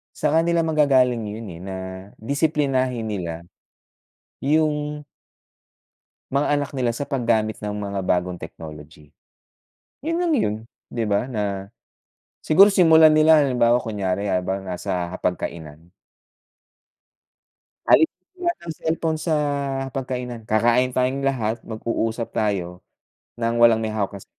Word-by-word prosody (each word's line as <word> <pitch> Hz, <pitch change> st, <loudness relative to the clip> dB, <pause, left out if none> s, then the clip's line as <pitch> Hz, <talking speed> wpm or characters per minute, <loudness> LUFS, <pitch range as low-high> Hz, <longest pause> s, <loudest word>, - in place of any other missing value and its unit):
sa 150 Hz, 0 st, 0 dB
kanila 165 Hz, 0 st, +2 dB
manggagaling 135 Hz, -6 st, +3 dB
yun, 110 Hz, +2 st, -6 dB
eh, 85 Hz, -, -11 dB
na 95 Hz, 0 st, -6 dB, 0.4 s
disiplinahin 135 Hz, -3 st, 0 dB
nila 90 Hz, -6 st, -3 dB, 1.0 s
yung 150 Hz, 0 st, 0 dB, 1.3 s
mga 140 Hz, +2 st, +1 dB
anak 145 Hz, -1 st, -1 dB
nila 120 Hz, -2 st, 0 dB
sa 130 Hz, -, -4 dB
paggamit 115 Hz, -4 st, 0 dB
ng 105 Hz, -1 st, -4 dB
mga 100 Hz, -1 st, -3 dB
bagong 90 Hz, 0 st, 0 dB
technology. 75 Hz, -2 st, -11 dB, 0.9 s
Yun 330 Hz, +4 st, -2 dB
lang 350 Hz, -1 st, +1 dB
yun, 220 Hz, -, +1 dB, 0.3 s
'di 115 Hz, -1 st, -2 dB
ba, 105 Hz, +4 st, 0 dB
na 100 Hz, -5 st, -3 dB, 0.7 s
siguro 175 Hz, +6 st, +7 dB
simulan 160 Hz, -5 st, +6 dB
nila 155 Hz, +1 st, +6 dB
halimbawa 125 Hz, -4 st, +3 dB
kunyari 100 Hz, -4 st, -2 dB
habang 95 Hz, 0 st, -1 dB
nasa 90 Hz, -1 st, -3 dB
hapag 90 Hz, -1 st, -1 dB
kainan. 80 Hz, +1 st, -8 dB, 2.0 s
Alisin 170 Hz, +3 st, +3 dB, 0.2 s
lahat 345 Hz, 0 st, +1 dB
ng 170 Hz, -1 st, -6 dB
cellphone 160 Hz, 0 st, -1 dB
sa 160 Hz, 0 st, 0 dB, 0.5 s
hapag-kainan, 125 Hz, -3 st, -5 dB
kakain 120 Hz, +4 st, +2 dB
tayong 130 Hz, +2 st, 0 dB
lahat, 115 Hz, -4 st, -1 dB
mag-uusap 115 Hz, +1 st, -3 dB
tayo 90 Hz, -4 st, -2 dB, 0.5 s
nang 115 Hz, 0 st, -1 dB
walang 115 Hz, -1 st, +6 dB
may 110 Hz, -, -1 dB
hawak 105 Hz, -3 st, -2 dB
na 100 Hz, -, -9 dB
ce -, -, -14 dB
120 Hz, 125 wpm, -22 LUFS, 100-145 Hz, 2.0 s, siguro